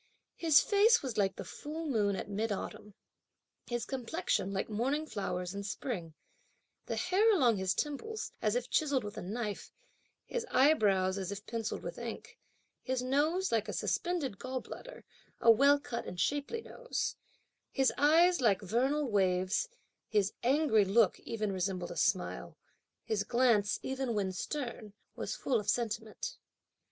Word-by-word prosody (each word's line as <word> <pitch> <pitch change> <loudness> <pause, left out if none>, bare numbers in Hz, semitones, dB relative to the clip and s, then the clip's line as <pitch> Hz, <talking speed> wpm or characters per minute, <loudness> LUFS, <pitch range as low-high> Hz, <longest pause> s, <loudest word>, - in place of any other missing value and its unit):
His 320 -4 +5
face 435 +1 +4
was 255 -5 -3
like 195 -1 +2
the - - -6
full 315 +3 -6
moon 210 -8 +1
at - - -5
mid 210 +2 -2
autumn; 210 +1 -5 0.7
his 240 -1 -2
complexion, 265 - -1
like 195 -1 -2
morning 265 +8 -1
flowers 180 - -3
in 200 - -4
spring; 200 - -4 0.7
the - - -2
hair 380 +5 +3
along 250 - +4
his 190 -1 0
temples, 430 +10 -3
as - - +1
if - - -1
chiselled 285 -5 +1
with 205 -1 -6
a - - -5
knife; 210 +2 -4 0.5
his 485 - -3
eyebrows, 200 -9 +3
as 190 0 -4
if 200 +1 -6
pencilled 225 -2 -3
with - - -6
ink; - - -7 0.4
his 255 -1 -2
nose 305 +8 +1
like 220 -2 +1
a - - -3
suspended 320 - -1
gallbladder 260 - -7 0.4
(a 230 - +7
well 280 +5 +5
cut 245 -4 -5
and 180 - -6
shapely 290 - -1
nose); - - -3 0.6
his 270 -1 +2
eyes 330 +3 +5
like 210 -6 +4
vernal 265 +9 +1
waves; 190 - +1 0.4
his 205 -2 +1
angry 260 -4 +4
look 200 0 +3
even 215 -3 -3
resembled 185 -1 -2
a - - -6
smile; - - -1 0.5
his 215 -2 -1
glance, 235 -3 +2
even 265 -3 -2
when 195 -2 0
stern, 235 0 -5 0.2
was - - -4
full 250 -4 0
of 210 - -4
sentiment. 225 - -2
235 Hz, 150 wpm, -32 LUFS, 205-290 Hz, 0.7 s, a